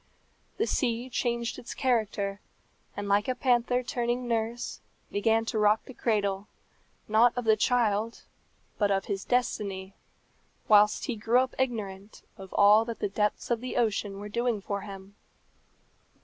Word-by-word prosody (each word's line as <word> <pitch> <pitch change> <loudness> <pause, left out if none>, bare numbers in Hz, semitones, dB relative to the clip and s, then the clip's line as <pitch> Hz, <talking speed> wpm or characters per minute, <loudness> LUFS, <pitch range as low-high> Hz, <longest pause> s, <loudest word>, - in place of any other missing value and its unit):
The 445 - +1
sea 245 - -1
changed 235 -1 -1
its 240 - -8
character, 210 -6 0 0.6
and, 205 0 -3
like 200 +1 +2
a 255 - 0
panther 245 0 +2
turning 240 0 -2
nurse, 230 +1 -2 0.3
began 225 +2 +2
to 225 - -2
rock 210 +1 +3
the 260 - -10
cradle, 200 -4 -1 0.6
not 230 +3 +4
of 245 - -2
the 220 -1 +5
child, 225 -1 +1 0.6
but 205 -2 +3
of 195 -1 +1
his 195 -1 -3
destiny, 200 -6 -1 0.7
whilst 210 0 +5
he 250 - -2
grew 225 +4 +3
up 260 - -3
ignorant 210 -6 -3
of 190 -1 -11
all 205 +2 +6
that 230 -1 -5
the 205 - -2
depths 210 +4 -1
of 235 0 0
ocean 215 -5 -1
were 205 - -6
doing 235 +1 -1
for 200 0 -4
him. 195 0 -10
220 Hz, 150 wpm, -28 LUFS, 205-240 Hz, 0.7 s, all